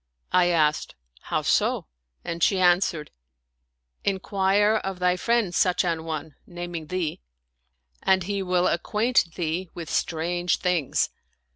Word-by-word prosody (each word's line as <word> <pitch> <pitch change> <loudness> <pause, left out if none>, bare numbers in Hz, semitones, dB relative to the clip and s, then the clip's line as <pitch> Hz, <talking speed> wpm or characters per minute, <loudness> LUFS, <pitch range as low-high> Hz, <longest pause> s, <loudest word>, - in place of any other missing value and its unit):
I 180 -1 +4
asked, 155 - +1
" - - -29
How - - 0
so? - - +1 0.2
" 60 0 -45
and 170 0 -4
she 190 - +3
answered, 175 -4 +2 0.5
" 60 0 -50
Inquire 200 +2 +2
of 190 -1 -4
thy 180 0 +2
friend 230 -1 +1
Sudh 180 0 +2
an 165 -2 -1
one 160 -1 -5
" - - -39
(naming 175 -2 -6
thee), 175 - -3 0.8
and 190 -1 +3
he 200 +2 -2
will 180 -1 +1
acquaint 210 0 +1
thee 175 +1 -2
with 170 -3 -6
strange 175 +2 0
things." 175 -6 0
175 Hz, 145 wpm, -25 LUFS, 160-190 Hz, 0.8 s, I